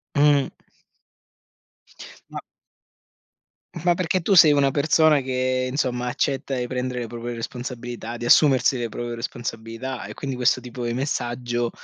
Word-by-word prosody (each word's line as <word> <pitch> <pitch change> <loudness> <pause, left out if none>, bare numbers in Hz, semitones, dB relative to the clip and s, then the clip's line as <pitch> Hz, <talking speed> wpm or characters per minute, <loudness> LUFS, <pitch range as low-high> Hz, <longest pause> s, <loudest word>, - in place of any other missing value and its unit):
Mh. 145 -1 +4 1.8
Ma - - -6 1.4
ma 175 - +5
perché 180 0 -1
tu 200 - 0
sei 165 -4 +8
una 140 -1 +3
persona 155 +1 +3
che, 130 0 -1
insomma, 125 -2 -1
accetta 135 +1 -1
e 125 - -2
prendere 125 0 -3
le 120 - -3
proprie 120 +1 -6
responsabilità, 120 0 -6
di 120 - -6
assumersi 130 -1 +4
le 120 -1 -2
proprie 120 +2 -5
responsabilità 115 +1 -5
e - - -8
quindi 135 -2 -5
questo 125 0 +2
tipo 125 0 -6
di 120 - -2
messaggio, 120 -2 -2
125 Hz, 135 wpm, -23 LUFS, 120-140 Hz, 1.8 s, sei